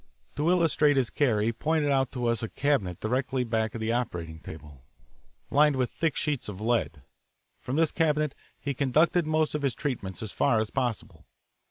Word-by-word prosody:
To 150 +4 +1
illustrate 160 -5 +3
his 130 -3 +1
care 120 -8 +2
he 115 +2 +1
pointed 155 +3 0
out 135 -1 +1
to 125 -2 -2
us 115 -2 +1
a 115 - -3
cabinet 120 - 0
directly 125 +3 -1
back 110 -1 -1
of 115 - -5
the 110 +1 0
operating 85 -10 -3
table, 75 -5 -11 0.7
lined 150 0 +4
with 130 -2 0
thick 165 -3 -1
sheets 145 -7 -2
of 100 -2 -7
lead. 110 - -1 0.6
From 130 - -4
this 160 0 +2
cabinet 150 -3 +1 0.3
he 140 - -3
conducted 155 +5 +2
most 155 0 +1
of 150 - -2
his 135 -5 0
treatments 115 -10 -4
as 110 - -5
far 115 - +2
as 110 -1 -2
possible. 125 -5 -3
130 Hz, 185 wpm, -28 LUFS, 110-150 Hz, 0.7 s, lined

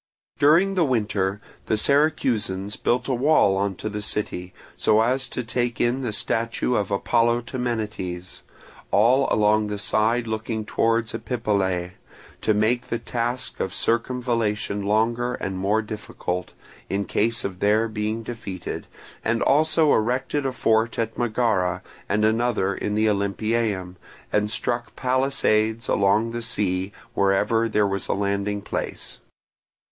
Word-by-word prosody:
During 170 +7 +5
the 180 -3 +2
winter 105 -7 0 0.3
the 110 - +2
Syracusans 110 -8 +1
built 125 - 0
a 135 - +1
wall 125 -6 +4
on 100 0 0
to 110 - -5
the 105 0 -4
city, 95 -3 -3 0.2
so 110 - +3
as 130 +3 +1
to 125 - -3
take 120 +1 -2
in 120 +3 +1
the 120 -4 -2
statue 115 +3 0
of 105 -5 0
Apollo 115 +4 +2
Temenites, 110 -8 -4 0.5
all 125 +7 +4
along 105 0 +3
the 105 0 -3
side 110 +3 +1
looking 110 0 -3
towards 115 0 +1
Epipolae, 100 -7 -1 0.5
to 110 - +2
make 120 +4 +1
the 120 - -1
task 120 +2 -3
of 95 - -2
circumvallation 115 -4 0
longer 115 +4 +1
and 95 -1 -4
more 105 +4 +1
difficult, 95 -4 -5 0.4
in 100 +1 -1
case 115 +2 +1
of 95 -2 -5
their 110 +2 +3
being 110 +1 -3
defeated, 105 -6 -6 0.4
and 115 +1 +1
also 155 +1 +4
erected 130 +5 0
a - - -1
fort 115 -2 +1
at 115 -1 -1
Megara 105 -7 0 0.3
and 105 +1 +2
another 110 -3 +1
in 105 +1 -3
the 110 +1 +2
Olympieum, 100 -2 -1 0.4
and 105 0 +2
stuck 120 +2 -2
palisades 120 -4 +1
along 105 +4 +2
the 120 0 -4
sea 95 -4 -1 0.2
wherever 105 +4 +2
there 105 -1 +2
was 100 0 -2
a - - +1
landing 100 0 -1
Place. - - -4
110 Hz, 140 wpm, -24 LUFS, 100-120 Hz, 0.5 s, During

